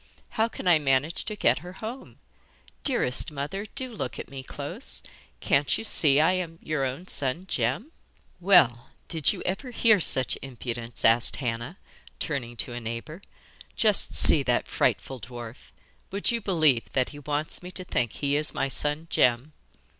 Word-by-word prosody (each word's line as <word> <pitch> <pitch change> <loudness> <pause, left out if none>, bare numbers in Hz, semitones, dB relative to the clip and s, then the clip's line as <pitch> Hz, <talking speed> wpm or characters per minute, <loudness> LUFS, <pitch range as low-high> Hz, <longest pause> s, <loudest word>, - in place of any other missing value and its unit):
'How 225 0 +1
can 225 - -7
I 170 -3 +6
manage 140 +3 +1
to 215 - -2
get 125 -11 +2
her 175 +4 -10
home? 225 +7 -8 0.7
Dearest 205 - +1
mother, 150 +9 -4
do 260 -3 -5
look 135 - -5
at - - -8
me 135 -1 -6
close. 130 - -7 0.4
Can't 140 +1 +2
you - - -5
see 150 -9 +5
I 160 +4 +4
am 175 -3 -3
your 155 -3 -1
own 135 +8 -5
son 145 +5 -1
Jem?' 135 - -1 0.5
'Well, 170 -11 +4 0.2
did 160 -5 +1
you - - -6
ever 195 +8 -3
hear 225 -3 +4
such 130 -6 +3
impudence?' 120 -3 -5
asked 115 +1 +4
Hannah, 120 +6 -4 0.4
turning 125 -6 -4
to 120 - -1
a 120 - -5
neighbour. 115 - -6 0.5
'Just 210 -3 +1
see 150 - +5
that 125 -3 0
frightful 125 +3 0
dwarf 120 0 -10 0.4
would 200 +4 +1
you 235 -1 -1
believe 155 - +2
that 130 -2 +1
he 145 - -10
wants 150 +1 -1
me 180 - -8
to 185 0 -1
think 125 -9 -1
he 140 0 -1
is 150 +1 +3
my 135 - 0
son 150 +3 +1
Jem? 125 +5 +2
145 Hz, 170 wpm, -26 LUFS, 125-185 Hz, 0.7 s, I